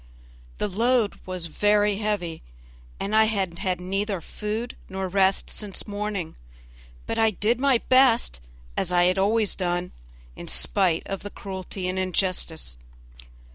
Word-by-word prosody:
The -, -, 0 dB
load 230 Hz, +2 st, +1 dB
was 185 Hz, -2 st, -4 dB
very 205 Hz, +4 st, +2 dB
heavy 200 Hz, -6 st, -2 dB, 0.6 s
and 205 Hz, +2 st, -1 dB
I 220 Hz, 0 st, +7 dB
had 190 Hz, -5 st, -1 dB
had 185 Hz, -2 st, -1 dB
neither 195 Hz, +2 st, -1 dB
food 215 Hz, +7 st, -4 dB
nor 190 Hz, 0 st, -3 dB
rest 190 Hz, +1 st, +3 dB
since 205 Hz, -1 st, -2 dB
morning; 205 Hz, -4 st, -3 dB, 0.7 s
but -, -, -2 dB
I 225 Hz, 0 st, +5 dB
did 220 Hz, +3 st, 0 dB
my 275 Hz, -2 st, +4 dB
best, 255 Hz, -, +4 dB, 0.3 s
as 180 Hz, -, -1 dB
I 175 Hz, 0 st, +5 dB
always 205 Hz, +2 st, +2 dB
had -, -, -10 dB
done, 175 Hz, 0 st, -1 dB, 0.4 s
in -, -, -9 dB
spite 180 Hz, -5 st, +3 dB
of 195 Hz, -, -4 dB
cruelty 190 Hz, -1 st, -5 dB
and 185 Hz, +1 st, -1 dB
injustice. 185 Hz, -, -1 dB
195 Hz, 135 wpm, -25 LUFS, 180-215 Hz, 0.7 s, I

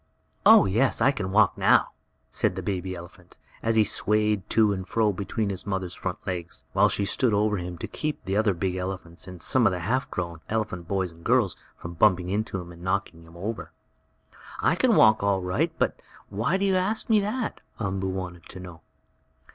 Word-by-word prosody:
"Oh, -, -, +8 dB
yes, 115 Hz, +8 st, +1 dB
I 135 Hz, -, +4 dB
can 100 Hz, -8 st, -4 dB
walk 105 Hz, -1 st, +4 dB
now," -, -, +4 dB, 0.4 s
said -, -, 0 dB
the 95 Hz, -, -5 dB
baby 95 Hz, -1 st, -3 dB
elephant, 90 Hz, +1 st, -13 dB, 0.2 s
as 115 Hz, 0 st, 0 dB
he 110 Hz, -, +6 dB
swayed 105 Hz, -1 st, +1 dB
to 110 Hz, -2 st, +3 dB
and 95 Hz, -1 st, -5 dB
fro 110 Hz, -1 st, +1 dB
between 100 Hz, +2 st, -2 dB
his 95 Hz, +1 st, -5 dB
mother's 95 Hz, -2 st, -2 dB
front 95 Hz, -1 st, -5 dB
legs, 90 Hz, -3 st, -5 dB
while -, -, +4 dB
she 100 Hz, -, 0 dB
stood 110 Hz, +3 st, +1 dB
over 105 Hz, 0 st, +1 dB
him 90 Hz, -1 st, -5 dB
to -, -, -5 dB
keep 155 Hz, -1 st, -4 dB
the 95 Hz, -, -1 dB
other 105 Hz, -2 st, +2 dB
big 90 Hz, +1 st, -2 dB
elephants, 90 Hz, -2 st, -6 dB
and 90 Hz, -2 st, -9 dB
some 125 Hz, -4 st, +4 dB
of -, -, +2 dB
the 90 Hz, -1 st, -3 dB
half 125 Hz, +10 st, -1 dB
grown 85 Hz, -3 st, -4 dB
elephant 105 Hz, -6 st, -2 dB
boys 95 Hz, -2 st, -1 dB
and 85 Hz, 0 st, -18 dB
girls, 120 Hz, -4 st, +2 dB, 0.2 s
from 85 Hz, -, -8 dB
bumping 90 Hz, 0 st, +3 dB
into 100 Hz, 0 st, -2 dB
him, 85 Hz, -1 st, -9 dB
and 85 Hz, 0 st, -13 dB
knocking 95 Hz, -2 st, -2 dB
him 85 Hz, +1 st, -15 dB
over. 105 Hz, +6 st, -5 dB, 0.9 s
"I -, -, +3 dB
can -, -, +3 dB
walk 110 Hz, 0 st, +6 dB
all 100 Hz, -2 st, +1 dB
right. 130 Hz, -, 0 dB
But -, -, -1 dB, 0.3 s
why 115 Hz, -, 0 dB
do 195 Hz, -, 0 dB
you 190 Hz, -1 st, +2 dB
ask 210 Hz, +4 st, -1 dB
me 220 Hz, -2 st, +4 dB
that?" 215 Hz, +4 st, -3 dB, 0.2 s
Umboo 95 Hz, -2 st, -2 dB
wanted 90 Hz, -3 st, -6 dB
to 95 Hz, -, -8 dB
know. 90 Hz, -3 st, -10 dB
95 Hz, 205 wpm, -26 LUFS, 90-110 Hz, 0.9 s, Oh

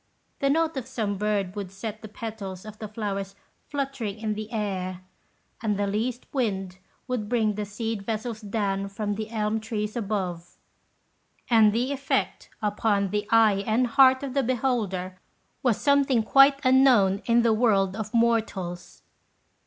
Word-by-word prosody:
The 275 Hz, -, +2 dB
note 320 Hz, 0 st, +1 dB
of 255 Hz, -2 st, -4 dB
some 220 Hz, -6 st, -2 dB
bird 200 Hz, -2 st, -1 dB
would 200 Hz, -3 st, -5 dB
set 215 Hz, +2 st, -6 dB
the 215 Hz, -, -8 dB
petals 210 Hz, -4 st, -7 dB
of 215 Hz, 0 st, -10 dB
the 215 Hz, -, -5 dB
flowers 200 Hz, -2 st, -4 dB, 0.3 s
fluttering 270 Hz, -7 st, -3 dB
in 215 Hz, -1 st, -2 dB
the 215 Hz, +1 st, -6 dB
air, 185 Hz, -4 st, -3 dB, 0.6 s
and 210 Hz, -3 st, 0 dB
the 205 Hz, -, 0 dB
least 225 Hz, +5 st, -2 dB
wind 195 Hz, -8 st, -2 dB, 0.3 s
would 240 Hz, -5 st, -3 dB
bring 220 Hz, -3 st, +2 dB
the 210 Hz, +1 st, -3 dB
seed 220 Hz, +1 st, -3 dB
vessels 220 Hz, +2 st, -4 dB
down 200 Hz, -2 st, -2 dB
from 205 Hz, +1 st, -3 dB
the 215 Hz, +1 st, -5 dB
elm 220 Hz, -1 st, -1 dB
trees 215 Hz, 0 st, -4 dB
above; 185 Hz, -6 st, -3 dB, 0.9 s
and 220 Hz, -2 st, +6 dB
the 245 Hz, +5 st, 0 dB
effect 280 Hz, 0 st, -2 dB
upon 205 Hz, -2 st, +1 dB
the 210 Hz, 0 st, -1 dB
eye 215 Hz, -3 st, +4 dB
and 230 Hz, +3 st, +3 dB
heart 260 Hz, +2 st, +5 dB
of 270 Hz, -2 st, -4 dB
the 275 Hz, -, +2 dB
beholder 225 Hz, -8 st, -1 dB, 0.4 s
was 245 Hz, -5 st, +1 dB
something 280 Hz, -4 st, +3 dB
quite 275 Hz, +4 st, +6 dB
unknown 250 Hz, -7 st, +5 dB
in 235 Hz, 0 st, +4 dB
the 230 Hz, -1 st, +4 dB
world 200 Hz, -4 st, +2 dB
of 215 Hz, -1 st, -5 dB
mortals. 220 Hz, -7 st, -1 dB
215 Hz, 155 wpm, -26 LUFS, 200-240 Hz, 0.9 s, and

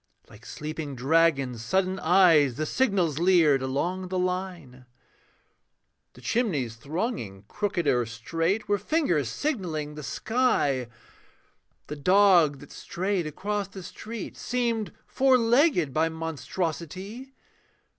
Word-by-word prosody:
Like 105 Hz, +2 st, -15 dB
sleeping 150 Hz, -2 st, -6 dB
dragon's 135 Hz, -3 st, +1 dB
sudden 190 Hz, +9 st, 0 dB
eyes 160 Hz, -7 st, +4 dB
The 155 Hz, -, -2 dB
signals 185 Hz, -, +1 dB
leered 165 Hz, -6 st, +4 dB
along 175 Hz, +8 st, -2 dB
the 185 Hz, 0 st, -3 dB
line. 180 Hz, -9 st, -4 dB, 1.3 s
The 125 Hz, -, -16 dB
chimneys 145 Hz, -, -1 dB
thronging 140 Hz, -, -4 dB
crooked 195 Hz, -, -2 dB
or 125 Hz, -4 st, +2 dB
straight 165 Hz, -, -2 dB
Were 205 Hz, 0 st, +1 dB
fingers 185 Hz, -, 0 dB
signalling 165 Hz, -, -3 dB
the 150 Hz, -, -8 dB
sky; 145 Hz, -, 0 dB, 1.0 s
The 150 Hz, -, -7 dB
dog 175 Hz, -3 st, +4 dB
that -, -, -13 dB
strayed 185 Hz, -2 st, -3 dB
across 205 Hz, +6 st, -3 dB
the 190 Hz, -1 st, -10 dB
street 225 Hz, +5 st, -8 dB
Seemed 235 Hz, -4 st, -1 dB
four 265 Hz, -1 st, +3 dB
legged 235 Hz, -, +3 dB
by 160 Hz, +1 st, +2 dB
monstrosity. 170 Hz, -, -5 dB
170 Hz, 115 wpm, -26 LUFS, 145-205 Hz, 1.3 s, eyes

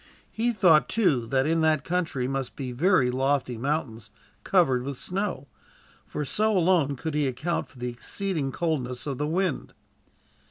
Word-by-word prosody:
He 235 Hz, +2 st, 0 dB
thought, 180 Hz, -8 st, +4 dB
too, 145 Hz, -, +2 dB
that 135 Hz, +2 st, +1 dB
in 165 Hz, +1 st, +1 dB
that 155 Hz, -2 st, +2 dB
country 165 Hz, -8 st, -1 dB
must 135 Hz, -1 st, -3 dB
be 130 Hz, -3 st, -5 dB
very 140 Hz, -1 st, +3 dB
lofty 130 Hz, -1 st, 0 dB
mountains, 115 Hz, -4 st, -3 dB, 0.3 s
covered 150 Hz, -10 st, +3 dB
with 135 Hz, +1 st, -5 dB
snow; 185 Hz, -6 st, -3 dB, 0.6 s
for 150 Hz, -, -4 dB
so 215 Hz, +8 st, +1 dB
alone 165 Hz, -5 st, +3 dB
could 160 Hz, +4 st, -4 dB
he 150 Hz, -2 st, +1 dB
account 145 Hz, +7 st, -2 dB
for -, -, -20 dB
the 125 Hz, 0 st, -3 dB
exceeding 155 Hz, +3 st, -2 dB
coldness 130 Hz, -7 st, -2 dB
of 140 Hz, -4 st, -4 dB
the 150 Hz, -, 0 dB
wind. 180 Hz, 0 st, -1 dB
145 Hz, 160 wpm, -26 LUFS, 130-175 Hz, 0.6 s, thought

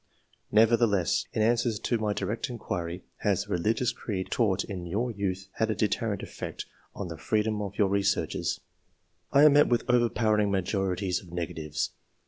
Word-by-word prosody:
Nevertheless, 110 Hz, -4 st, +3 dB
in 110 Hz, -, +1 dB
answer 120 Hz, +1 st, +2 dB
to 120 Hz, -, 0 dB
my 105 Hz, -1 st, 0 dB
direct 115 Hz, +5 st, -2 dB
inquiry 90 Hz, -7 st, -4 dB
" -, -, -43 dB
Has -, -, +1 dB
the -, -, -12 dB
religious 110 Hz, +7 st, +1 dB
creed 95 Hz, -4 st, -4 dB
taught 100 Hz, -5 st, +2 dB
in 90 Hz, -3 st, -6 dB
your 115 Hz, +8 st, -1 dB
youth 95 Hz, -3 st, -3 dB
had 110 Hz, -, +1 dB
a 110 Hz, -, 0 dB
deterrent 105 Hz, 0 st, -1 dB
effect -, -, -6 dB, 0.3 s
on 100 Hz, -3 st, -5 dB
the 85 Hz, -1 st, -7 dB
freedom 110 Hz, -1 st, 0 dB
of 100 Hz, 0 st, -5 dB
your 100 Hz, -, +4 dB
researches 100 Hz, 0 st, 0 dB, 0.7 s
VI 140 Hz, +1 st, +6 dB
am 150 Hz, -, +7 dB
met 145 Hz, +1 st, +6 dB
with 120 Hz, -2 st, +2 dB
an 125 Hz, -, +3 dB
overpowering 110 Hz, -3 st, +2 dB
majority 95 Hz, 0 st, -1 dB
of 90 Hz, -, -15 dB
negatives. 80 Hz, -4 st, -3 dB
105 Hz, 170 wpm, -28 LUFS, 95-115 Hz, 0.7 s, am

